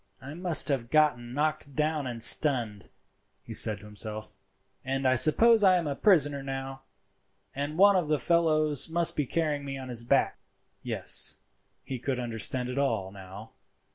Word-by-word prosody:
"I 140 +3 -10
must 175 0 +1
have 125 -5 -2
been 125 -6 0
knocked 145 -2 -2
down 150 -2 -2
and 115 -2 -5
stunned," 115 - +2 0.5
he - - -10
said 105 -2 +2
to - - -14
himself, 105 +1 -6 0.4
"and 135 0 -2
I 130 - +3
suppose 210 - +5
I 185 -2 +5
am 170 - -3
a 145 -2 -3
prisoner 145 -7 +2
now, 135 0 -7 0.7
and 145 +3 -5
one 200 +1 +5
of 180 -4 0
the 150 0 0
fellows 155 -1 +1
must 170 0 +1
be 145 -3 -2
carrying 150 -2 -2
me 135 -1 -6
on 130 -1 -9
his 120 -1 -2
back." 120 - 0 0.4
Yes, - - -2 0.5
he 130 -2 -7
could 130 +1 -4
understand 120 +1 -3
it 125 +2 -4
all 110 -9 -2
now. 95 +2 -12
135 Hz, 170 wpm, -27 LUFS, 120-155 Hz, 0.7 s, suppose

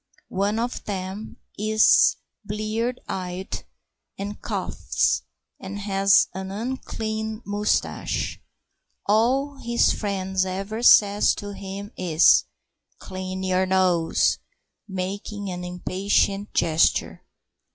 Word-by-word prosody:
One 200 +3 0
of 240 +2 -2
them 195 +1 -5 0.2
is 215 +1 +5 0.3
blear 215 +4 -2
eyed 185 0 -5 0.5
and 205 +1 -6
coughs, - - 0 0.4
and 195 +1 -6
has 195 0 +4
an 190 +1 -5
unclean 220 0 -4
moustache. 205 +1 -1 0.6
All 260 +7 +2
his 235 -2 +2
friend 190 -2 -3
ever 195 +4 -4
says 205 -3 +6
to 205 0 -6
him 200 +1 -7
is: 170 -3 +5 0.5
"Clean 185 0 -6
your 185 0 +1
nose," 180 -3 +2 0.5
making 200 +1 -4
an 180 0 -5
impatient 195 +3 0
gesture. 160 0 +2
200 Hz, 95 wpm, -24 LUFS, 190-215 Hz, 0.6 s, says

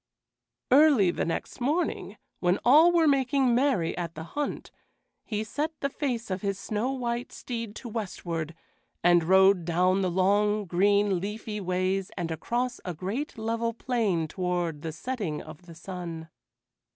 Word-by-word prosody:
Early 270 - +6
the - - -2
next 170 +8 -4
morning, 305 +8 -1 0.2
when 180 +1 +2
all 310 +8 +7
were 335 -2 +4
making 270 -2 +3
merry 245 -10 +1
at 170 -2 -4
the 160 - -6
hunt, 290 - -4 0.5
he 215 -1 -3
set 300 +8 -3
the 280 - -2
face 240 -8 -3
of 185 0 -2
his 195 -1 -1
snow 220 +6 -2
white 240 -2 -3
steed 230 -4 -6
to 245 - -8
westward 170 -7 -4 0.5
and 175 -1 +5
rode 190 +1 +5
down 180 +3 +2
long, 200 +3 +2
green, 200 +2 +2
leafy 210 +2 -5
ways 185 +1 -1
and 170 -3 -2
across 240 +10 -2
a 180 -3 -4
great 225 - -4
level 230 +1 -1
plain 215 -10 0
toward 175 -3 -2
the 160 - -4
setting 185 -3 -4
of 155 +3 -12
the 165 - -11
sun. 170 -2 -7
200 Hz, 150 wpm, -27 LUFS, 175-245 Hz, 0.5 s, all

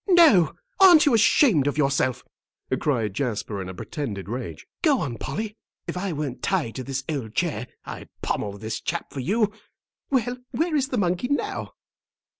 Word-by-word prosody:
"No; 315 - +6 0.2
aren't 360 -5 +8
you 285 - +4
ashamed 215 - +5
of 145 - -1
yourself," 135 -3 +1 0.6
cried 115 -9 0
Jasper, 105 -4 -2
in 90 - -6
a - - -6
pretended 105 - -5
rage. 105 -9 -5 0.2
"Go 295 -7 +4
on, 120 -5 -3
Polly. 210 +9 -4 0.3
If - - -4
I 190 +1 -2
weren't 145 -5 -4
tied 170 - 0
to 130 - -4
this 135 +1 -3
old 130 -8 -4
chair 135 -9 -1 0.2
I'd - - -8
pommel 100 -1 -2
this 110 +2 -4
chap 170 +2 -3
for 140 - -4
you. 210 - +1 0.6
Well, 250 -2 +1
where 325 0 0
is 270 -3 +2
the 255 - -2
monkey 180 +3 +1
now?" 285 +2 -2
150 Hz, 170 wpm, -25 LUFS, -, 0.6 s, aren't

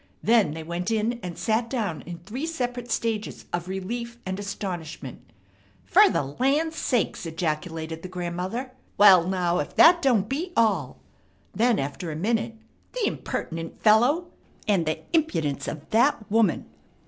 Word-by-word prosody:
Then 215 -9 +3
they 160 - -6
went 170 +4 -3
in 225 +2 0
and 175 -2 -6
sat 230 +1 0
down 210 - -2
in 175 -1 -6
three 220 - -5
separate 245 -6 -3
stages 225 -2 -2
of 175 0 -2
relief 235 +6 -4
and 190 +1 -3
astonishment. 175 - -6 0.6
"Fer - - +6
the - - 0
land 275 - 0
sakes!" 245 - -1
ejaculated 160 0 -3
the 185 - -6
grandmother. 185 +8 -4 0.3
"Wall, 190 -4 +7
now, 180 -2 +1
if 145 - -4
that 345 +1 +7
don't 235 - +3
beat 330 +9 -3
all!" 195 - +2 0.6
then 235 +1 +3
after 145 +5 -4
a - - -5
minute: 225 +6 -1 0.4
"The - - -1
impertinent 165 - -4
fellow! 245 +11 +4 0.4
And 190 -6 +2
the 155 - -1
impidence 230 - 0
of 155 0 -6
the 240 +6 +5 0.2
woman! 220 -5 +2
205 Hz, 150 wpm, -25 LUFS, 170-240 Hz, 0.6 s, Wall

